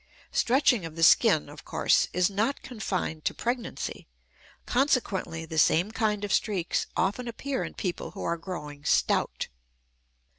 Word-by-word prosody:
Stretching 255 Hz, -, +3 dB
of 165 Hz, -1 st, -7 dB
the 165 Hz, -, -1 dB
skin, 165 Hz, -3 st, +5 dB
of 145 Hz, +1 st, -11 dB
course, -, -, +2 dB
is 180 Hz, 0 st, +3 dB
not 215 Hz, +7 st, -1 dB
confined 185 Hz, -9 st, -3 dB
to -, -, 0 dB
pregnancy; 240 Hz, 0 st, -3 dB, 0.6 s
consequently, 225 Hz, -, 0 dB
the 160 Hz, 0 st, -2 dB
same 175 Hz, +6 st, +3 dB
kind 210 Hz, -2 st, 0 dB
of 205 Hz, -, -1 dB
streaks 190 Hz, -6 st, 0 dB
often 200 Hz, +7 st, 0 dB
appear 265 Hz, +3 st, -3 dB
in -, -, -7 dB
people 180 Hz, -4 st, -3 dB
who -, -, -8 dB
are 170 Hz, -, 0 dB
growing 150 Hz, -5 st, -7 dB
stout. -, -, +1 dB
195 Hz, 145 wpm, -28 LUFS, 165-235 Hz, 0.6 s, skin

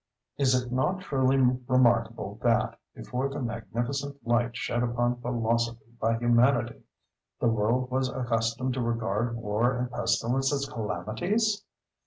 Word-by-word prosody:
Is 135 Hz, -2 st, +3 dB
it 125 Hz, -1 st, -7 dB
not 180 Hz, +9 st, 0 dB
truly 135 Hz, -4 st, +2 dB, 0.3 s
remarkable 130 Hz, -2 st, +2 dB
that, -, -, +1 dB, 0.2 s
before 130 Hz, +2 st, -3 dB
the 140 Hz, -, -5 dB
magnificent 120 Hz, +4 st, -3 dB
light 120 Hz, 0 st, +1 dB
shed 120 Hz, +1 st, -1 dB
upon 120 Hz, 0 st, 0 dB
philosophy 115 Hz, -1 st, -1 dB
by 115 Hz, 0 st, +1 dB
Humanity, 120 Hz, 0 st, +2 dB, 0.6 s
the -, -, +2 dB
world 115 Hz, +4 st, +1 dB
was 130 Hz, 0 st, +1 dB
accustomed 120 Hz, 0 st, -1 dB
to 130 Hz, -, -2 dB
regard 115 Hz, 0 st, -1 dB
War 115 Hz, +3 st, 0 dB
and 125 Hz, 0 st, -2 dB
Pestilence 125 Hz, +3 st, +1 dB
as 140 Hz, -1 st, 0 dB
calamities? 135 Hz, -, -1 dB
120 Hz, 130 wpm, -28 LUFS, 115-130 Hz, 0.6 s, Is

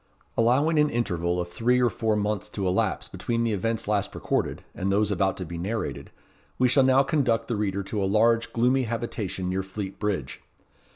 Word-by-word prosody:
Allowing 140 Hz, +8 st, +3 dB
an 150 Hz, 0 st, +4 dB
interval 90 Hz, -8 st, -1 dB
of 90 Hz, 0 st, -3 dB
three 120 Hz, +7 st, +2 dB
or 125 Hz, -1 st, +3 dB
four 110 Hz, -1 st, 0 dB
months 105 Hz, -1 st, -1 dB
to 100 Hz, -2 st, -2 dB
elapse 90 Hz, -, 0 dB
between 115 Hz, -1 st, -2 dB
the 115 Hz, -2 st, 0 dB
events 110 Hz, +3 st, -1 dB
last 105 Hz, -2 st, 0 dB
recorded, -, -, -1 dB
and 95 Hz, +1 st, -2 dB
those 105 Hz, +1 st, +2 dB
about 95 Hz, 0 st, +1 dB
to 90 Hz, -, -4 dB
be 85 Hz, +1 st, -6 dB
narrated, 110 Hz, +6 st, -3 dB, 0.5 s
we 130 Hz, -, +4 dB
shall 135 Hz, +3 st, +4 dB
now 130 Hz, +1 st, +5 dB
conduct 125 Hz, -7 st, +1 dB
the 120 Hz, -, -1 dB
reader 100 Hz, -1 st, -1 dB
to 100 Hz, +1 st, -2 dB
a -, -, +2 dB
large, 115 Hz, +4 st, +3 dB
gloomy 125 Hz, +3 st, +2 dB
habitation 110 Hz, -5 st, -3 dB
near 95 Hz, +1 st, 0 dB
Fleet 95 Hz, 0 st, -6 dB
Bridge. 95 Hz, -11 st, -3 dB
105 Hz, 190 wpm, -26 LUFS, 95-120 Hz, 0.5 s, now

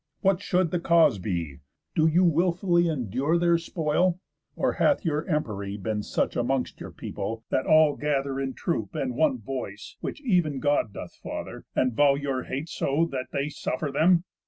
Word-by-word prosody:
What 195 Hz, -1 st, +2 dB
should 180 Hz, -4 st, +1 dB
the 175 Hz, -, 0 dB
cause 165 Hz, -, +4 dB
be? 85 Hz, -8 st, -3 dB, 0.3 s
Do 160 Hz, 0 st, +3 dB
you 170 Hz, +4 st, +4 dB
wilfully 175 Hz, +1 st, +3 dB
Endure 135 Hz, -, 0 dB
their 170 Hz, -1 st, +3 dB
spoil? 170 Hz, +2 st, 0 dB, 0.4 s
Or -, -, +1 dB
hath 285 Hz, -8 st, +3 dB
your 150 Hz, -1 st, 0 dB
empery 105 Hz, -, -2 dB
Been 105 Hz, +1 st, -2 dB
such -, -, -1 dB
amongst 125 Hz, +2 st, -1 dB
your -, -, -7 dB
people, 110 Hz, +3 st, -5 dB
that 130 Hz, -, 0 dB
all 155 Hz, -2 st, +5 dB
gather 140 Hz, -2 st, -1 dB
In 135 Hz, -1 st, -3 dB
troop, 115 Hz, -, -2 dB
and 130 Hz, -2 st, -1 dB
one 140 Hz, 0 st, +2 dB
voice 110 Hz, -4 st, -6 dB
(which -, -, -4 dB
ev'n 175 Hz, -, +2 dB
God 145 Hz, -5 st, +1 dB
doth -, -, -8 dB
father) -, -, -7 dB
And 130 Hz, -2 st, +2 dB
vow 140 Hz, +3 st, +4 dB
your 140 Hz, -2 st, -2 dB
hate 140 Hz, +5 st, -4 dB
so, 155 Hz, +3 st, 0 dB
that 130 Hz, -1 st, -3 dB
they 140 Hz, +2 st, -1 dB
suffer 145 Hz, 0 st, -3 dB
them? 170 Hz, +4 st, +4 dB
145 Hz, 175 wpm, -26 LUFS, 125-170 Hz, 0.4 s, all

